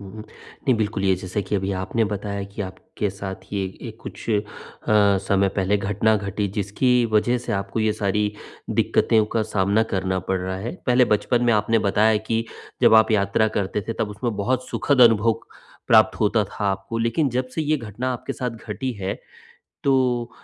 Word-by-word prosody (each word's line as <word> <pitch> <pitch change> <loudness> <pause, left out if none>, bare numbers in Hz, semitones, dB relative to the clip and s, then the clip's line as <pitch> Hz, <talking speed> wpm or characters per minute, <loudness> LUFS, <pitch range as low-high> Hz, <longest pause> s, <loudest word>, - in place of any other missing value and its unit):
हुँ, 100 -1 -10
हुँ, 110 - -8
नहीं 120 +3 -4
बिल्कुल 105 -2 -1
ये 95 -1 +4
जैसा 95 +2 -3
कि 95 +2 -4
अभी 95 0 0
आपने 115 +4 0
बताया 100 -1 -3
कि 100 +2 -6
आपके 95 +2 -5
साथ 95 -1 -7
ये 100 -1 -1 0.2
ये 120 - -5
कुछ - - -9
अ, 105 - +3 0.9
समय 100 0 +3
पहले 95 +1 0
घटना 105 +2 +1
घटी 100 0 -2
जिसकी 120 +5 +2
वजह 120 +4 +3
से 120 - -5
आपको 100 +2 -2
ये 110 0 +2
सारी 105 0 0 0.4
दिक्क़तों 110 -2 +2
का 115 - +2
सामना 100 +1 +1
करना 95 0 0
पड़ 95 - +1
रहा 95 +1 -3
है। 115 +5 -4 0.2
पहले 125 0 +5
बचपन 120 +4 +1
में 120 - +4
आपने 110 +2 +2
बताया 105 +1 +3
कि 115 0 0 0.4
जब - - +7
आप 110 0 +6
यात्रा 105 +1 +2
करते 100 +1 -1
थे - - 0
तब 105 - 0
उसमें 105 +2 -3
बहुत 130 +5 -1
सुखद 140 -3 +1
अनुभव 115 -1 +5 0.5
प्राप्त 110 -1 +5
होता 105 0 +2
था 100 +1 -6
आपको 95 +4 -4
लेकिन 115 +6 +1
जब 125 +1 -1
से 160 - -1
ये 155 +1 +1
घटना 120 +1 -4
आपके 125 +2 -5
साथ 125 -2 -3
घटी 115 +3 -5
है, 95 +1 -2 0.7
तो 125 -3 +2
105 Hz, 190 wpm, -23 LUFS, 100-115 Hz, 0.9 s, जब